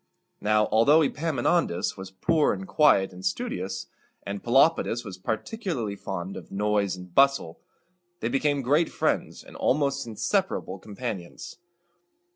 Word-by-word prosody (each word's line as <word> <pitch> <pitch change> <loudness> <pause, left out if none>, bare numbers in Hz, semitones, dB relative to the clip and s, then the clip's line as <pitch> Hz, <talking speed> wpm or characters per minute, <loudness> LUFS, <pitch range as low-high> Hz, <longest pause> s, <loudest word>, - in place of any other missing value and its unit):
Now, 105 0 +3
although 140 +9 +5
Epaminondas 150 - 0
was 95 0 -8
poor, 145 - +1
quiet, 95 -9 +3
and 90 +1 -11
studious, 95 0 -3 0.4
and 100 0 -4
Pelopidas 120 -2 +3
was 95 -3 -8
particularly 120 - -3
fond 95 -1 -5
of - - -11
noise 105 -1 0
and 90 -1 -12
bustle, 140 -11 +3 0.6
they - - -1
became 140 +2 +1
great 150 +6 +3
friends - - -1
and - - -14
almost 140 -1 0
inseparable 100 -3 -1
companions. 105 - -7
110 Hz, 120 wpm, -26 LUFS, 95-140 Hz, 0.6 s, although